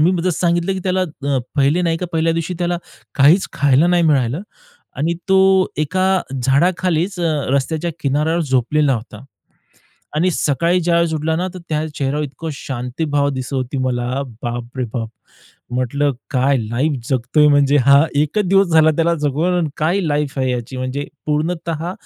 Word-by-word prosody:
मी 180 +2 +2
सांगितलं 175 +2 0
की 190 - -3
त्याला 185 0 +1
अ, 145 -5 -2 0.2
पहिले 145 +6 +3
नाही 165 -1 +1
का 180 - -3
पहिल्या 165 0 +1
दिवशी 165 +2 -3
त्याला 175 -1 -1 0.4
काहीच 150 +7 +4
खायला 140 +3 +3
नाही 175 -1 +3
मिळालं 140 -2 +1 0.6
आणि 160 +5 0
तो 190 0 +5 0.4
एका 185 +5 +1 0.2
झाडाखालीच 175 +6 +1
अ, 155 -4 0
रस्त्याच्या 155 +5 -1
किनाऱ्यावर 150 +4 0
झोपलेला 135 +1 +1
होता. 120 +3 -8 0.9
आणि 180 +4 +2
सकाळी 170 +4 +1
ज्यावेळेस 170 -1 +1
उठला 160 +1 -1
ना 180 - -1
तर - - -6
त्या 155 0 -1
चेहऱ्यावर 145 +2 -1
इतकं 160 +3 -6
शांतीभाव 140 +2 -2
दिसत 130 0 -5
होती 130 +1 -2
मला 130 +1 -1 0.2
बापरे 120 +2 -4
बाप! 115 -3 -2 0.7
म्हटलं 140 +3 0 0.2
काय 135 0 +2
लाईफ 120 +7 -1 0.2
जगतोय 140 +4 +2
म्हणजे 145 0 +4
हा. 140 +3 +6
एकच 150 +9 +1
दिवस 195 0 +4
झाला 160 -1 +5
त्याला 170 0 +2
जगून 150 +5 +1
आणि 165 -3 0
काय 170 +6 +1
लाईफ 150 -5 -1
आहे 130 -1 +1
ह्याची. 125 +1 -4
म्हणजे 130 +3 -3 0.2
पूर्णतः 165 +2 -2
150 Hz, 155 wpm, -18 LUFS, 135-170 Hz, 0.9 s, हा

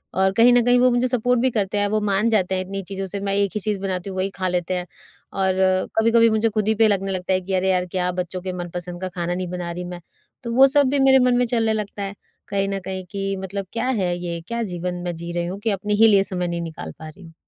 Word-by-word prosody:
और 190 0 +3
कहीं 230 +4 +6
न 245 0 +5
कहीं 245 0 +4
वो 255 +1 +5
मुझे 245 +1 +2
सपोर्ट 245 0 +1
भी 260 - +3
करते 205 -2 -1
हैं, 205 0 +2
वो 215 +1 +1
मान 210 +2 +1
जाते 190 -4 +1
हैं 185 - -1
इतनी 195 +1 -5
चीज़ों 195 +1 -5
से, 200 +2 -5
मैं 195 0 -2
एक 200 -1 +1
ही - - 0
चीज 210 0 -1
बनाती 190 -1 -3
हूँ, 190 - -6
वही 190 +1 0
खा 185 -1 -2
लेते 180 0 -1
हैं। 180 -1 -2 0.5
और 190 -1 +1 0.5
कभी-कभी 230 +1 +5
मुझे 220 +1 +2
खुद 215 -1 -1
ही 220 - +3
पे 220 +1 +4
लगने 195 -2 0
लगता 185 0 -1
है 185 - +1
कि 190 +1 -5
अरे 190 0 +1
यार, 180 -1 +1
क्या 180 0 -1
बच्चों 180 0 -4
के 185 0 -4
मनपसंद 175 0 -6
का 185 - -2
खाना 175 -1 -3
नहीं 185 0 -3
बना 175 -1 -4
रही 175 +1 -5
मैं, 175 0 -7 0.4
तो 235 - -4
वो 265 +2 +8
सब 285 0 +3
भी 280 +1 +1
मेरे 265 0 +6
मन 250 -1 +3
में 245 - +3
चलने 225 -2 +1
लगता 210 -1 -4
है, 195 0 -4 0.3
कहीं 195 0 0
न 195 0 -2
कहीं 190 0 -4
कि 195 0 -2
मतलब 195 +1 -4
क्या 235 - -1
है 190 -9 0
ये, 175 -1 -4
क्या 235 0 -2
जीवन 180 -3 -4
मैं 175 -1 -3
जी 170 +1 -7
रही 170 0 -2
हूँ, 185 +3 -5
कि 220 - -1
अपने 205 +1 -2
ही - - +9
लिए 200 -3 +5
समय 180 -2 -2
नहीं 170 0 -3
निकाल 165 -1 -7
पा 155 -1 -8
रही 185 +5 -15
हूँ। 165 -1 -13
195 Hz, 285 wpm, -22 LUFS, 180-220 Hz, 0.5 s, ही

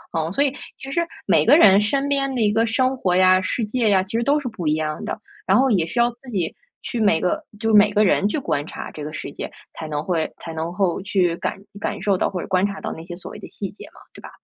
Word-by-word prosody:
嗯。 160 0 -1
所 280 +9 +2
以 275 -2 0 0.2
其 270 - -8
实 340 - +1 0.2
每 - - +4
个 295 - +6
人 200 - +7
身 275 +7 0
边 275 -1 0
的 - - -1
一 210 -2 +2
个 225 +1 +2
生 255 +3 +1
活 185 -8 0
呀、 185 0 +5
世 220 +4 -1
界 225 +1 +1
呀， 190 -2 +4
其 195 +4 -7
实 235 - +1
都 285 +4 +3
是 280 - -5
不 210 -9 -5
一 150 - +3
样 155 -1 -3
的， - - -4 0.3
然 - - +5
后 265 0 +3
也 175 -6 +2
需 235 - -3
要 240 0 +4
自 245 +2 -15
己 180 -7 -1 0.3
去 240 - -4
每 205 -7 +3
个 180 - 0 0.2
就 225 0 0
每 210 0 +6
个 210 +1 +3
人 200 +1 +3
去 210 - -1
观 145 - -2
察 - - -7
这 150 - -8
个 150 - -5
世 - - -6
界， - - -6 0.2
才 160 - -7
能 150 -1 -3
会 165 -2 -1
才 165 - -8
能 160 +1 -3
够 180 -1 0
去 185 -3 +1
感 - - -3 0.2
感 200 - -3
受 195 0 +2
到 - - +1
或 180 -3 -4
者 - - -7
观 185 0 +2
察 200 -1 -4
到 - - -4
那 160 - -9
些 175 0 -7
所 175 - -9
谓 - - -9
的 - - -9
细 195 -3 -6
节 200 - -12
嘛， - - -18
对 - - -12
吧？ - - -10
200 Hz, 310 characters per minute, -22 LUFS, 175-235 Hz, 0.3 s, 人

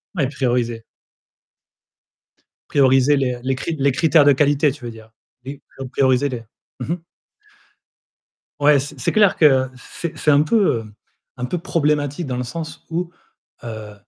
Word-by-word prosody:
Ouais, 140 -6 +1
prioriser. 120 -4 -1 1.9
Prioriser 135 +1 +4
les 125 -2 -1
les 135 0 0
cri 160 +5 -4
les 140 0 +3
critères 155 +2 +4
de 145 - +7
qualité, 145 +1 +3
tu 130 -3 -11
veux 120 - -5
dire. 110 0 -14 0.3
Oui, 135 +1 -8 0.2
prio 135 -2 -7
prioriser 130 +1 +2
les 120 -3 -6 0.4
mmh 150 +7 -2
mh. 175 - -5 1.6
Ouais, 145 0 +5
c'est 140 0 -7
c'est - - 0
clair 210 -3 +4
que 130 -4 +4
c 160 +6 -7
c'est - - -16
c'est 150 - +2
un 145 +1 +5
peu, 160 - +2
hem, 110 -1 -13 0.4
un 125 - -3
peu 180 - -2
problématique 150 -2 -1
dans 125 - -3
le 125 - -2
sens 155 +5 -7
où, 170 +1 -2 0.5
heu 110 -2 -7
140 Hz, 160 wpm, -20 LUFS, 125-150 Hz, 1.9 s, de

